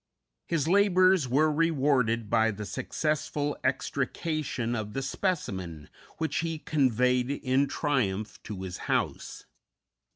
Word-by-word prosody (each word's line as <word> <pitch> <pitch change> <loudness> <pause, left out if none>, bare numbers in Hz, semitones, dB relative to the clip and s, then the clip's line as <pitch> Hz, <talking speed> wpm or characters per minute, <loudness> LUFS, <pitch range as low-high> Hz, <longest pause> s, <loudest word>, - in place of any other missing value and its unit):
His 160 -3 0
labors 185 -4 +4
were 150 +5 +3
rewarded 135 -8 +2
by 110 +1 +3
the 105 -1 -5
successful 145 - -2
extrication 145 -7 -1
of 105 -2 -4
the 135 - -2
specimen, 95 - -3 0.3
which 160 -3 -1
he 165 -1 -1
conveyed 125 -4 +1
in 140 0 +1
triumph 110 -11 -1
to 100 -3 -7
his 90 -2 -5
house. - - -2
135 Hz, 110 wpm, -28 LUFS, 110-155 Hz, 0.3 s, labors